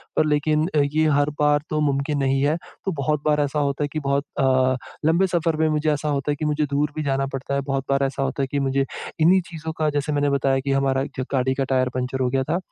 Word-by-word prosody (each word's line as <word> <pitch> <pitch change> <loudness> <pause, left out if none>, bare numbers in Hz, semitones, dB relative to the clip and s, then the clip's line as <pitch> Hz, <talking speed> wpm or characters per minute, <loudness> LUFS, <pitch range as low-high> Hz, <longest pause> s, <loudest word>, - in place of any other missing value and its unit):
पर - - +3
लेकिन 155 +1 +1 0.3
ये 155 +1 +3
हर 145 +1 +2
बार 150 0 +3
तो 155 - -1
मुमकिन 145 0 0
नहीं 135 0 +1
है। 145 +3 +2 0.3
तो 195 - 0
बहुत 150 +1 0
बार 150 -1 +3
ऐसा 145 +1 -1
होता 140 0 0
है - - 0
कि 155 - -1
बहुत 140 0 0
अ, 130 -1 +3 0.3
लंबे 170 +4 +3
सफर 170 -2 0
में 160 0 +2
मुझे 155 0 +1
ऐसा 150 +1 -2
होता 140 0 0
है - - 0
कि 155 - -3
मुझे 150 0 +1
दूर 145 +1 +1
भी 155 - -2
जाना 135 -1 0
पड़ता 135 +1 -4
है। 140 - 0
बहुत 135 -1 -2
बार 140 0 +2
ऐसा 135 0 -2
होता 135 +1 -1
है - - -1
कि 145 - 0
मुझे 135 0 +1 0.4
इन्हीं 185 +4 +5
चीज़ों 160 -1 -6
का 155 -1 +1
जैसे 145 +1 -1
मैंने 145 0 +1
बताया 135 -1 +2
कि 135 +1 -2
हमारा 135 -1 +1
एक - - -7
जगह 130 - -2
गाड़ी 130 +1 +1
का 135 - 0
टायर 130 -1 +2
पंचर 130 +1 -2
हो 125 - +2
गया 135 +1 0
था। 155 +5 -1
145 Hz, 265 wpm, -23 LUFS, 135-150 Hz, 0.4 s, इन्हीं